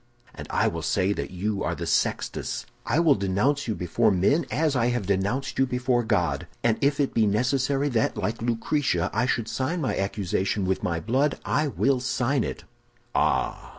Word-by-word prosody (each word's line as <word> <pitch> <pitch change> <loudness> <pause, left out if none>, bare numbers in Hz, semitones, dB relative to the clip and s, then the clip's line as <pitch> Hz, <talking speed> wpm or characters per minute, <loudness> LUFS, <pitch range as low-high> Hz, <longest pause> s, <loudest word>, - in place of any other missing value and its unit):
"'And - - -9
I - - +2
will 85 0 -2
say 95 +4 +1
that - - -4
you 100 +3 -2
are - - -1
the - - -5
Sextus. - - -1 0.2
I 125 +7 +2
will 165 -4 +5
denounce 105 +9 0
you 110 - -1
before 110 +6 +1
men, 120 - +2
as 155 -2 +1
I 120 -2 +2
have 120 -4 -1
denounced 100 +9 -1
you 135 - +4
before 125 0 +1
God; 90 -11 0 0.2
and 115 -2 +2
if 140 +1 +2
it 140 - +1
be 110 -2 +3
necessary 135 +6 +1
that, 115 -4 0
like 115 +1 -2
Lucretia, 115 - 0
I 125 - +1
should 120 -3 0
sign 140 +10 -2
my 145 - -1
accusation 95 0 -1
with 95 0 0
my 85 -1 -1
blood, 135 - 0
I 150 +1 +1
will 135 -1 +1
sign 130 0 0
it.' - - -5 0.5
"'Ah! - - 0
120 Hz, 185 wpm, -25 LUFS, 100-135 Hz, 0.5 s, will